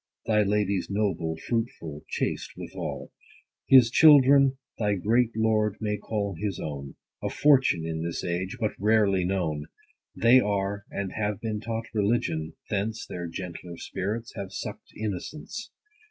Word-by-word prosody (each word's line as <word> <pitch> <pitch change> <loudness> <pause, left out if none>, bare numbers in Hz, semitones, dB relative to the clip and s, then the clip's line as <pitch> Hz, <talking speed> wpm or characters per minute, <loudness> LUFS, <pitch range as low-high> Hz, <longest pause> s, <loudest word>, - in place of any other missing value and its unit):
Thy 105 -1 +3
lady's 100 -2 0
noble, 100 -6 -1
fruitful, 85 -8 -3
chaste - - -2
withal. - - -6 0.6
90 - - +7
His 115 - -4
children 140 -2 +7 0.2
thy 105 -2 +1
great 115 +5 +2
lord 110 -2 +2
may 105 -1 -1
call 100 -3 -2
his 95 +1 -3
own; 70 -3 -6 0.3
A - - -1
fortune, 135 - +3
in 80 0 -3
this 85 0 -3
age, 90 +5 -2
but 110 -3 0
rarely 100 -2 +3
known. 80 -6 -1 0.5
They 120 +3 +6
are, 100 -2 -1
and 100 -2 -4
have 105 -2 -2
been 110 -2 -3
taught 115 +1 -4
religion; 100 -7 0
thence 110 +2 -2
Their 90 -1 -5
gentler 85 0 -7
spirits 105 +5 -4
have 100 -2 -6
suck'd - - -7
innocence. 110 - -5
105 Hz, 140 wpm, -27 LUFS, 90-115 Hz, 0.6 s, 90